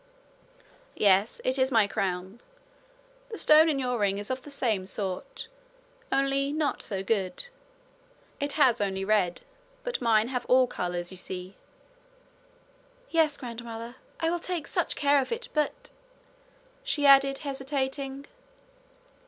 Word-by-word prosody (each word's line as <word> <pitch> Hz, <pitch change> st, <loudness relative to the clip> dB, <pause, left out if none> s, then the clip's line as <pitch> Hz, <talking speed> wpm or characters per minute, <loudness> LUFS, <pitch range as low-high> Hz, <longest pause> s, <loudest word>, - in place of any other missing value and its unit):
'Yes, 200 Hz, +1 st, +3 dB
it 260 Hz, +1 st, 0 dB
is 260 Hz, +1 st, +2 dB
my 225 Hz, -4 st, +5 dB
crown. 190 Hz, +2 st, -3 dB, 0.9 s
The 440 Hz, -, -6 dB
stone 310 Hz, -1 st, +6 dB
in 295 Hz, -, +1 dB
your 250 Hz, -3 st, -1 dB
ring 200 Hz, -1 st, +1 dB
is 205 Hz, +4 st, -3 dB
of 260 Hz, 0 st, -3 dB
the 290 Hz, -, -12 dB
same 225 Hz, -9 st, -1 dB
sort 200 Hz, -, -5 dB, 0.6 s
only 275 Hz, +1 st, +1 dB
not 305 Hz, -1 st, -1 dB
so 195 Hz, -2 st, -3 dB
good. 200 Hz, -, -2 dB, 0.9 s
It 285 Hz, 0 st, 0 dB
has 265 Hz, -7 st, +3 dB
only 195 Hz, -1 st, -1 dB
red, 195 Hz, -4 st, +1 dB, 0.4 s
but -, -, -3 dB
mine 225 Hz, -1 st, +3 dB
have 250 Hz, -2 st, -2 dB
all 255 Hz, 0 st, +5 dB
colours, 175 Hz, -6 st, -4 dB
you 185 Hz, -, -10 dB
see.' 185 Hz, +1 st, -6 dB, 1.6 s
'Yes, 315 Hz, -3 st, +3 dB
grandmother. 235 Hz, 0 st, -7 dB, 0.2 s
I 325 Hz, 0 st, +1 dB
will 345 Hz, -, -1 dB
take 340 Hz, -3 st, -3 dB
such -, -, -1 dB
care 285 Hz, -1 st, +3 dB
of 260 Hz, -, -6 dB
it! 465 Hz, +1 st, -4 dB
But 300 Hz, -2 st, -2 dB, 0.4 s
' -, -, -32 dB
she 290 Hz, -1 st, 0 dB
added, 275 Hz, 0 st, +6 dB
hesitating. 270 Hz, 0 st, -3 dB
260 Hz, 135 wpm, -28 LUFS, 205-285 Hz, 1.6 s, stone